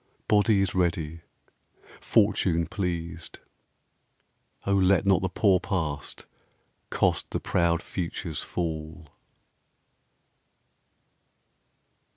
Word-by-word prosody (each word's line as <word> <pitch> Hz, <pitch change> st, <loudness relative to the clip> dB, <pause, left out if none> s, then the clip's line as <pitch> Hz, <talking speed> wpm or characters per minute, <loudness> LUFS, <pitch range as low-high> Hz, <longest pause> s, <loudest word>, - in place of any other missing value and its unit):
Body 105 Hz, -1 st, +4 dB
is 95 Hz, -, 0 dB
ready, 85 Hz, -3 st, -1 dB, 0.8 s
Fortune 95 Hz, -6 st, +2 dB
pleased; 85 Hz, -2 st, -4 dB, 1.3 s
O 100 Hz, -, +1 dB
let 95 Hz, -2 st, +3 dB
Not 95 Hz, -3 st, +4 dB
the 95 Hz, -, -1 dB
poor 95 Hz, 0 st, +3 dB
Past 80 Hz, -8 st, -3 dB, 0.6 s
cost -, -, +1 dB
the -, -, -2 dB
proud 85 Hz, -1 st, +1 dB
Future's 85 Hz, -3 st, -4 dB
fall. 80 Hz, -1 st, -5 dB
90 Hz, 80 wpm, -27 LUFS, 80-95 Hz, 1.3 s, Body